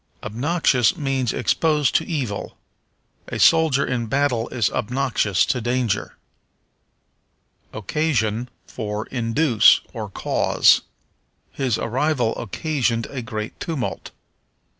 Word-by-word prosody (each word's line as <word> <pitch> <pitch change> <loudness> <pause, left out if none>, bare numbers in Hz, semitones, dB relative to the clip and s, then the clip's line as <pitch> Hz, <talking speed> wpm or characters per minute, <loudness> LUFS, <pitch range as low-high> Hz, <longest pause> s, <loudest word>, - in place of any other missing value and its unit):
Obnoxious 130 0 +1
means 135 -5 -1
exposed 150 +3 +1
to - - +1
evil. 130 - -4 0.7
A - - -5
soldier 160 -4 +4
in 120 -3 -2
battle 125 -2 0
is 120 -5 0
obnoxious 115 -5 0
to 125 - -1
danger. 120 -2 -1 1.5
Occasion 115 - -1 0.2
for 105 -2 -5
Induce, 120 0 +4
or 110 -4 -5
Cause. - - +3 0.7
"His 130 -5 -1
arrival 125 0 0
occasioned 115 - -1
a 135 -3 -4
great 110 -2 -6
tumult." 155 -7 -4
125 Hz, 95 wpm, -22 LUFS, 110-140 Hz, 1.5 s, soldier